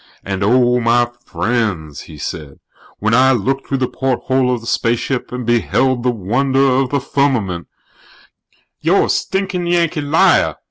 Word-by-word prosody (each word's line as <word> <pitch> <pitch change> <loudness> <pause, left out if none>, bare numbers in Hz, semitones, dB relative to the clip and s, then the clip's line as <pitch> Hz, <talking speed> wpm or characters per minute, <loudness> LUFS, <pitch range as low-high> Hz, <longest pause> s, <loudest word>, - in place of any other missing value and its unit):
"And, 95 0 -3
oh, 125 +3 +3
my 120 0 +2
friends," 95 - -2
he 80 - -11
said, 70 0 -7 0.4
"when 110 +2 0
I 130 +2 +5
looked 135 +4 -2
through 135 - -1
the 130 -1 0
porthole 130 0 0
of 120 -2 -2
the - - -12
spaceship 120 +3 -1
and 125 -1 -5
beheld 120 +2 +1
the 125 - +1
wonder 130 +6 +1
of 130 0 +1
the 140 - 0
Firmament 125 -11 -1 0.6
" - - -40
"You're - - +3
a - - -5
stinkin' 190 -2 -1
Yankee 170 -2 +1
liar!" 145 +3 +3
125 Hz, 155 wpm, -17 LUFS, 115-135 Hz, 0.6 s, I